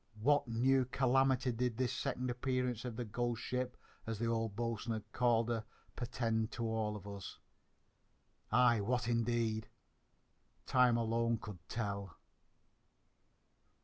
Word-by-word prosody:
What 145 +4 +3
new 130 +3 +3
calamity 130 0 +3
did 120 -1 -1
this 125 0 0
second 125 -2 -2
appearance 125 -1 -1
of 120 -3 -4
the 120 +1 -3
"ghost 120 +2 -2
ship," 125 0 -2 0.3
as 115 -1 -2
the 115 - -1
old 115 -2 0
boatswain 115 -1 -2
called 120 -2 +3
her, 115 -2 0 0.3
portend 115 -3 -1
to 115 - -2
all 110 -1 -1
of 105 -1 -8
us? 100 -2 -7 1.1
Aye, 120 -1 +5
what, 120 +3 0
indeed! 115 -2 +1 1.0
Time 125 -2 +4
alone 115 0 +1
could 105 -4 -8
tell. 100 -5 -3
115 Hz, 125 wpm, -36 LUFS, 110-125 Hz, 1.1 s, Aye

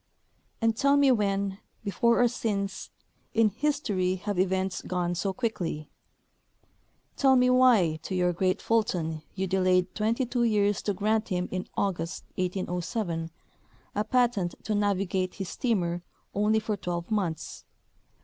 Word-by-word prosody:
And 225 -1 +3
tell 280 +4 +3
me 280 -2 +5
when, 200 -3 0 0.2
before 235 +4 +3
or - - +6
since, 200 -5 -3 0.5
in 225 -1 +5
history 210 -7 0
have 195 0 -3
events 190 0 0
gone 175 -1 -1
so 195 +3 -1
quickly? 180 -9 -3 1.2
Tell 265 -2 +4
me 250 0 +4
why 230 -11 +4
to 185 - -4
your 180 -1 +2
great 185 +2 0
Fulton 175 -8 0
you 190 0 -1
delayed 185 -1 +2
twenty 230 +4 0
two 245 0 -1
years 205 -3 +2
to 205 - -1
grant 215 +2 +1
him 180 -2 -1
in 185 0 -3
August, 175 -4 -2
1807, 180 -1 -2 0.6
a 210 - 0
patent 235 -8 +1
to 215 - -1
navi 200 -2 +1
gate 185 0 -1
his 195 -3 -5
steamer 175 -8 -1 0.3
only 210 +2 +2
for 215 -1 -2
twelve 175 -1 -4
months? 185 -7 -2
195 Hz, 140 wpm, -28 LUFS, 180-225 Hz, 1.2 s, or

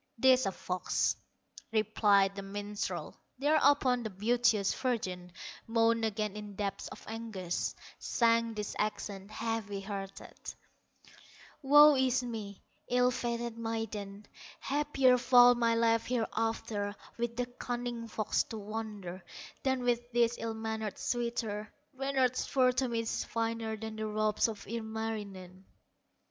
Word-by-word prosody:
"'Tis 260 -2 +5
a - - 0
fox", 180 0 0 0.6
replied 205 -2 +3
the 200 - -4
minstrel. 205 +1 -4 0.2
Thereupon 285 -3 +3
the 220 - -3
beauteous 215 0 +2
virgin 185 -8 -2 0.4
Moaned 230 0 +3
again 210 -1 -2
in 210 -1 -7
depths 200 -1 -3
of - - -11
anguish, 220 -6 -3 0.2
Sang 230 -1 +2
these 210 -1 -4
accents, 205 -1 -3
heavy 215 -2 -3
hearted: 195 -1 -7 1.3
"Woe 295 +1 +8
is 260 -1 +2
me, 215 -5 -6 0.3
ill 250 0 +4
fated 235 -1 -3
maiden! 215 -3 -4 0.3
Happier 275 -3 +3
far 245 0 +7
my 230 -1 +2
life 230 0 +2
hereafter, 225 -3 -1 0.2
With 235 0 -1
the 245 - 0
cunning 245 -1 -4
fox 215 -1 0
to 225 - -7
wander, 205 -4 -6 0.4
Than 265 -2 0
with 240 0 0
this 235 -1 +3
ill 225 -1 -3
mannered 220 -2 -3
suitor; 235 -3 -2 0.2
Reynard's 265 -2 0
fur 255 -2 +4
to 255 +1 0
me 230 -1 -1
is 225 - -2
finer 225 -1 -2
Than 220 0 -6
the 220 0 -2
robes 215 0 +1
of 215 -3 -6
Ilmarinen." 210 -4 -5
225 Hz, 125 wpm, -32 LUFS, 210-245 Hz, 1.3 s, Woe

